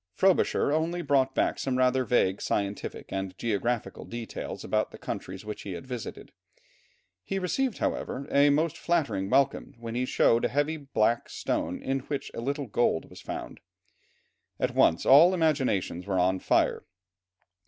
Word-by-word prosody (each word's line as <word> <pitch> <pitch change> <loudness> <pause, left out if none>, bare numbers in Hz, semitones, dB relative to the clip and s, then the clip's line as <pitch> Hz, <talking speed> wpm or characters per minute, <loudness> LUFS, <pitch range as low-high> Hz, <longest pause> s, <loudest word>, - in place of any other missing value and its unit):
Frobisher 190 -6 +3
only 165 +3 0
brought 135 -2 +2
back - - +1
some 130 -2 -1
rather 130 0 +3
vague 100 -6 +1
scientific 100 0 -2
and 95 -1 -4
geographical 115 +1 -2
details 120 -1 -6
about - - 0
the - - -12
countries 95 +2 -6
which 105 0 -6
he 100 - -6
had 85 - -7
visited; 125 -3 -7 0.9
he 195 - -3
received, 225 +7 -1
however, 140 +2 -2
a 140 +1 +5
most 155 +2 +1
flattering 115 - 0
welcome 135 +3 +1
when 115 -1 -6
he 125 +1 0
showed 115 -2 +3
a - - +3
heavy 145 +3 0
black 120 -5 0
stone 85 +3 -2
in 135 0 0
which 140 +1 -5
a - - -5
little 140 +3 -2
gold 115 -7 0
was - - -11
found. - - -6 1.0
At - - 0
once 80 - +3
all 165 +7 +7
imaginations 130 - 0
were 95 -2 0
on 95 +1 +2
fire. - - +1
125 Hz, 155 wpm, -28 LUFS, 105-145 Hz, 1.0 s, all